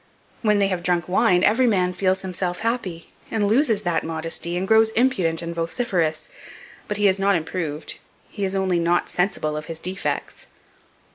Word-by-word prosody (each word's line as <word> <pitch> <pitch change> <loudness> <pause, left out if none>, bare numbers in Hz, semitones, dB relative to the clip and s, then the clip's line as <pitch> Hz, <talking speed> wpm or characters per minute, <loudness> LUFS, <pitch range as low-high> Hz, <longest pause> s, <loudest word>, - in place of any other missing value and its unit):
When 210 -2 +3
they 200 -1 +2
have 185 -2 -2
drunk 175 -2 0
wine, 180 0 +3
every 245 +4 +4
man 180 -5 +2
feels 190 0 0
himself 180 -1 -2
happy, 220 -8 -3 0.2
and 210 -2 0
loses 225 -2 +2
that 175 -3 0
modesty, 165 +2 -3
and 190 +2 -2
grows 220 +1 +5
impudent 185 -10 +1
and 170 0 -4
vociferous; 165 -3 -1 0.6
but 210 - -3
he 205 -1 +3
is 190 0 +2
not 200 0 +3
improved, 160 -2 -4 0.3
he 205 - -6
is 195 0 0
only 190 -2 +1
not 170 +1 +1
sensible 180 -5 0
of 150 0 -5
his 165 0 -6
defects." 185 +3 -4
185 Hz, 170 wpm, -23 LUFS, 170-205 Hz, 0.6 s, grows